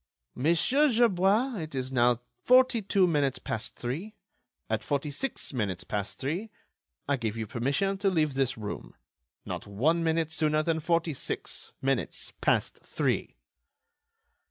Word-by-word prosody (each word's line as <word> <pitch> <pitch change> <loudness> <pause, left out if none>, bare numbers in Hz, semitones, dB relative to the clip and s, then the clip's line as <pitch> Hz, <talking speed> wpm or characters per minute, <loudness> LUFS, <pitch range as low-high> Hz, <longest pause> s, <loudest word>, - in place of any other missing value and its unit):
"Monsieur 170 - +3
Gerbois, 225 +1 +3
it 155 -3 -6
is 130 0 -2
now 120 -1 +3 0.2
forty 255 -2 +5
two 195 -1 +3
minutes 145 -6 +1
past 110 +3 -3
three. 165 - -5 0.5
At - - -1
forty 145 0 -1
six 240 - -2
minutes 100 -7 -2
past 100 -2 -3
three, 170 +11 -3 0.6
I 140 0 +2
give 115 -2 -3
you 110 - -2
permission 140 - 0
to 200 0 +3
leave 155 -6 +1
this 135 -2 0
room. 105 -2 -6 0.5
Not - - -5
one 150 +12 +1
minute 160 -1 +1
sooner 155 -1 +1
than 160 0 0
forty 165 0 +1
six - - -4
minutes 135 0 -1
past - - +1
three." - - -1
155 Hz, 140 wpm, -29 LUFS, 125-190 Hz, 0.6 s, forty